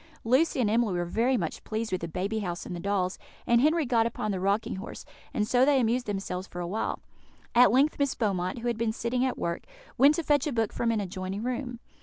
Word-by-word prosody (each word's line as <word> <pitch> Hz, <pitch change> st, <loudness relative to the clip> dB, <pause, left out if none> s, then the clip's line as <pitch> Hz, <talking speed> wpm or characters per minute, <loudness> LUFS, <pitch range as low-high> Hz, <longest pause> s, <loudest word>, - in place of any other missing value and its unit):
Lucy 260 Hz, +6 st, +2 dB
and 240 Hz, -, +3 dB
Emily 220 Hz, -3 st, +2 dB
were 175 Hz, 0 st, -1 dB
very 235 Hz, +8 st, +1 dB
much -, -, -4 dB
pleased 220 Hz, 0 st, -3 dB
with 185 Hz, -, -1 dB
the 170 Hz, -, -3 dB
baby 195 Hz, +7 st, -2 dB
house 175 Hz, -4 st, -4 dB
and 180 Hz, -, -5 dB
the -, -, -5 dB
dolls, 190 Hz, 0 st, -1 dB, 0.3 s
and 235 Hz, 0 st, +4 dB
Henry 310 Hz, +2 st, +3 dB
got 235 Hz, -2 st, +3 dB
upon 215 Hz, -2 st, -3 dB
the 190 Hz, -, -2 dB
rocking 200 Hz, +4 st, 0 dB
horse; 195 Hz, -, -8 dB, 0.3 s
and 210 Hz, -, -1 dB
so 250 Hz, +1 st, +4 dB
they 280 Hz, 0 st, +4 dB
amused 245 Hz, +1 st, +1 dB
themselves 195 Hz, -2 st, -3 dB
for 175 Hz, -, -8 dB
a 175 Hz, -, -2 dB
while. 210 Hz, +6 st, -2 dB, 0.6 s
At 245 Hz, +1 st, +7 dB
length 275 Hz, +6 st, +3 dB
Miss 280 Hz, -2 st, +1 dB
Beaumont, 185 Hz, -4 st, -1 dB
who 240 Hz, +1 st, -4 dB
had 235 Hz, -2 st, -1 dB
been 225 Hz, -1 st, 0 dB
sitting 245 Hz, +2 st, -1 dB
at 260 Hz, -, 0 dB
work, 170 Hz, 0 st, -2 dB, 0.4 s
went 285 Hz, +4 st, +7 dB
to 335 Hz, -, -2 dB
fetch 290 Hz, -1 st, +2 dB
a -, -, -1 dB
book 225 Hz, -4 st, 0 dB
from 235 Hz, -, 0 dB
an 225 Hz, -2 st, +1 dB
adjoining 190 Hz, +2 st, -4 dB
room. 250 Hz, 0 st, -3 dB
225 Hz, 240 wpm, -28 LUFS, 195-250 Hz, 0.6 s, At